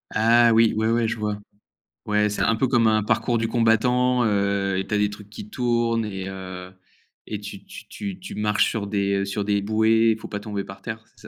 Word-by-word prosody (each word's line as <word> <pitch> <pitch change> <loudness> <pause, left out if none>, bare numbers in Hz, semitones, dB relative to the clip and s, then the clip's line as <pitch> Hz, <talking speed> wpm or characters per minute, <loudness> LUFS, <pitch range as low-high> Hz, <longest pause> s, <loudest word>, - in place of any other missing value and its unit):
Ah 115 +1 +5
oui, 115 0 +4
ouais, 110 +1 +1
ouais, 115 -1 +1
je 115 - -3
vois. 105 -1 -2 0.7
Ouais, 105 0 +1
c'est 105 - -2
un 115 - +2
peu 130 +3 +1
comme 120 -3 +3
un 110 -1 +2
parcours 115 +3 0
du 115 0 -1
combattant, 125 +2 +2
heu, 100 -2 0
et 95 - -3
tu - - -3
as - - +2
des 105 0 +2
trucs 105 0 -11
qui 200 - -9
tournent 120 - 0
et 95 -2 -5
heu 95 -1 -8 0.5
et - - -5
tu - - -9
tu - - -12
tu 100 -2 -6
tu - - -8
marches 105 0 +1
sur 105 -3 -3
des, 100 -1 0
heu, - - -1
sur 100 +1 -3
des 100 -1 +1
bouées. 110 +2 +3
Il 110 - 0
faut - - -9
pas 105 - -4
tomber 105 -2 -4
par 95 0 -12
terre. 110 -1 -6
C'est - - -20
110 Hz, 235 wpm, -23 LUFS, 100-115 Hz, 0.7 s, Ah